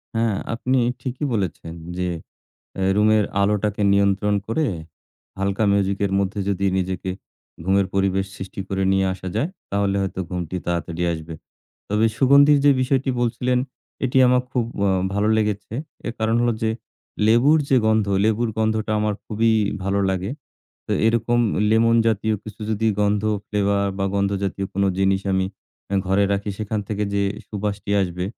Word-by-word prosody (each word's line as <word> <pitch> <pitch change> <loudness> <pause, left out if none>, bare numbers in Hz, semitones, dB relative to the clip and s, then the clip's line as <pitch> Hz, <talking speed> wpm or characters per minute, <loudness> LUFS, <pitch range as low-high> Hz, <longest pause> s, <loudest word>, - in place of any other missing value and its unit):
হ্যাঁ, 115 -2 +1 0.2
আপনি 125 +3 0 0.2
ঠিকই 130 +3 -3
বলেছেন 85 -5 -3 0.2
যে, 90 - -1 0.7
অ্যা 95 - -2
রুমের 105 0 +4 0.2
আলোটাকে 105 0 0
নিয়ন্ত্রণ 100 +1 +2
করে, 150 +8 0 0.7
হালকা 100 +2 0
মিউজিকের 100 0 +1
মধ্যে 100 +1 -2
যদি 100 0 0
নিজেকে 95 0 -2 0.5
ঘুমের 95 0 +2
পরিবেশ 95 0 +1
সৃষ্টি 95 +1 -6
করে 95 0 -1
নিয়ে 95 0 +2
আসা 95 0 -8
যায়, 145 +10 0 0.2
তাহলে 100 0 +1
হয়তো 95 -1 -3
ঘুমটি 90 -1 -4
তাড়াতাড়ি 85 0 -2
আসবে। 80 0 -7 0.6
তবে 105 +2 +2
সুগন্ধির 140 +2 +6
যে 145 - +7
বিষয়টি 130 +1 +1
বলছিলেন 125 +1 +1 0.5
এটি 130 +1 0
আমার 125 0 +4
খুব 125 -4 0 0.2
আ - - +3 0.2
ভালো 100 +1 +1
লেগেছে। 105 0 -1 0.3
এর 115 - -3
কারণ 110 +1 +1
হলো 120 0 +2
যে, 110 - +2 0.6
লেবুর 125 +8 +5
যে 135 - +5
গন্ধ, 110 -1 +3 0.2
লেবুর 110 +1 +1
গন্ধটা 110 0 0
আমার 105 0 0
খুবই 115 +1 +1 0.3
ভালো 100 +1 0
লাগে। 95 +3 -2 0.6
তো - - -2
এরকম 115 +1 +2 0.3
লেমন 115 +1 +4
জাতীয় 110 0 +1
কিছু 110 0 -10
যদি 110 +1 0
গন্ধ, 105 0 +2 0.2
ফ্লেভার 100 -1 +1
বা 95 - 0
গন্ধ 100 0 +1
জাতীয় 95 0 -2
কোনো 100 0 +2
জিনিস 95 0 +2
আমি 95 0 +1 0.6
ঘরে 95 +2 +3
রাখি 100 +1 -1
সেখান 110 0 -2
থেকে 105 -1 -1
যে 100 - +2 0.3
সুবাসটি 105 -1 -4
আসবে, 90 -1 -3
105 Hz, 150 wpm, -22 LUFS, 95-115 Hz, 0.7 s, যে